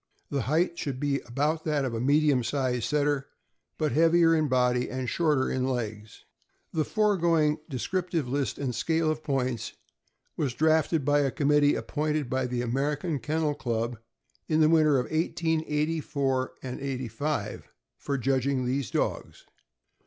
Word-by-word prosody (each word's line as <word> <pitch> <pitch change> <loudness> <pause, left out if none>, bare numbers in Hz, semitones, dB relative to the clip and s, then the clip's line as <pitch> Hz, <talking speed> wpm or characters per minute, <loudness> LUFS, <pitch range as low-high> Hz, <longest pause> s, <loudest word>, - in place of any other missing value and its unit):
The 140 - 0
height 160 - 0
should 135 -3 -3
be 140 -1 0
about 150 +6 0
that 150 -3 0
of 125 - -3
a 115 - -2
medium 145 -1 +3
sized 125 -1 -1
Setter, 145 -2 0 0.5
but 155 -2 0
heavier 165 +3 +4
in 155 -2 +2
body 125 -1 +1
and 130 -1 -3
shorter 150 -3 +1
in 130 - -1
legs. 110 -4 -5 0.5
The 160 - +1
foregoing 170 -7 +2
descriptive 165 +2 -2
list 135 -2 -1
and 135 -3 -2
scale 160 +6 +1
of 155 0 -4
points 130 -6 -2 0.6
was 130 -5 -2
drafted 160 0 +2
by 145 +1 +3
a 140 -1 +2
committee 145 0 +3
appointed 150 -3 -2
by 130 -1 0
the 125 0 -2
American 145 +5 -1
Ken 155 +4 -2
nel 150 -2 +1
Club, 115 -3 -3 0.5
in 155 -1 +2
the 155 -1 +5
winter 155 -3 +4
of 125 - -2
1884 155 -4 -1
85, 135 +2 -4 0.3
for 140 -1 -3
judging 130 0 0
these 130 +1 -1
dogs. - - -3
145 Hz, 145 wpm, -27 LUFS, 130-155 Hz, 0.6 s, the